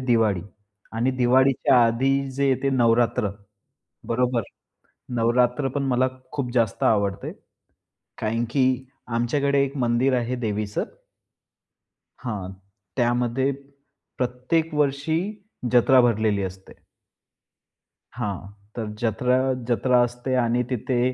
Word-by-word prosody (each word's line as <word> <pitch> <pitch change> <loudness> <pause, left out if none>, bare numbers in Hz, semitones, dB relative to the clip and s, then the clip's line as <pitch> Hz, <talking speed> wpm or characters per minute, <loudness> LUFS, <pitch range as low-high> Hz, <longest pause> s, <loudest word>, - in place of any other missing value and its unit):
दिवाळी 115 -7 +2 0.5
आणि 125 +3 +2
दिवाळीच्या 130 0 +4
आधी 135 +4 +1
जे 140 +1 +1
येते 135 +1 +1
नवरात्र, 115 -4 +2 0.8
बरोबर. 125 0 +1 0.7
नवरात्रपण 125 +4 +1
मला 130 0 +2 0.2
खूप 130 -4 -3
जास्त 115 -5 +1
आवडते 100 -3 +1 0.9
कारण 115 +2 -1
की 135 -1 +2 0.5
आमच्याकडे 140 +4 +2
एक 140 +1 -4
मंदिर 125 +2 +2
आहे 120 +1 -1
देवीचं 105 -3 -2 1.4
हां. 100 -6 -4 0.5
त्यामध्ये 120 +1 +1 0.7
प्रत्येक 130 +6 -1
वर्षी 150 +3 +1 0.5
जत्रा 125 +1 +6
भरलेली 110 -3 +1
असते. 95 0 -7 1.4
हां. 105 -6 -2 0.4
तर 115 -2 -3
जत्रा, 125 +2 +1 0.3
जत्रा 125 +1 +3
असते 125 +2 -3
आणि 120 0 +2
तिथे 125 0 -1
125 Hz, 95 wpm, -24 LUFS, 115-130 Hz, 1.4 s, जत्रा